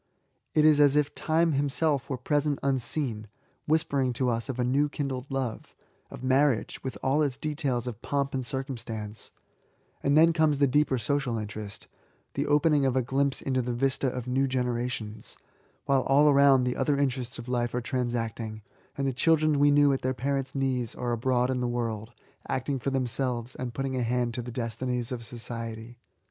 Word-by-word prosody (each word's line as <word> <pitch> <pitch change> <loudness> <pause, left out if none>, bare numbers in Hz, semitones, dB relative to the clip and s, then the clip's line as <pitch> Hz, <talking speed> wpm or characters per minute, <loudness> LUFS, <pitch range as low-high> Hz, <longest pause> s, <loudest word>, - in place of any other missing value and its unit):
It 155 - +5
is 155 -1 +6
as 145 -1 +5
if 150 -1 +2
Time 165 +1 +1
himself 140 0 0
were 130 - -2
present 145 +2 0
unseen, 130 -4 -1 0.4
whispering 140 -5 +1
to 125 0 0
us 115 +1 -3
of 130 - -3
a 125 - +1
new 140 +4 +2
kindled 135 -2 -4
love, 130 -4 -4 0.2
— - - -39
of - - -10
marriage, 130 -2 +1
with 130 - -4
all 140 +3 +2
its 140 -4 0
details 145 -6 -1
of 120 -4 -5
^' - - -47
pomp 140 -1 -1
and 130 -1 -1
circumstance 115 -5 -5 0.4
;'' - - -40
and 140 +2 +3
then 165 +1 +6
comes 155 -3 +3
the 140 - +4
deeper 140 0 +2
social 125 0 -1
interest, 105 -1 -7 0.3
— - - -40
the - - -1
opening 150 0 +3
of 130 -2 +1
a 130 - +2
glimpse 135 +2 0
into 130 -1 0
the 120 0 -2
vista 135 +2 0
of 125 -1 -3
new 130 +2 +1
generations, 120 -4 -3 0.5
while 135 -1 +3
all 140 +3 +4
around 140 -2 +6
the 125 0 -1
other 140 +1 +1
interests 130 -3 -1
of 120 - -8
life 120 -1 -1
are - - +1
transacting, 115 -3 -3 0.3
and 135 0 0
the 135 - 0
children 155 +2 +3
we 145 0 +5
knew 145 -1 +5
at 135 - -2
their 130 0 -1
parents' 135 +2 -2
knees 130 -4 -1
are 120 -1 -2
abroad 125 +2 +1
in 125 -1 -1
the 125 - 0
world, 115 -2 -3 0.4
acting 135 +1 -1
for 135 - -1
themselves, 125 -1 -1
and 125 -2 -6
putting 135 -1 -2
a 125 - 0
hand 120 0 0
to 125 - -3
the 120 - -7
destinies 120 +1 -3
of 120 -2 -4
society. 115 0 -7
130 Hz, 195 wpm, -28 LUFS, 120-140 Hz, 0.5 s, is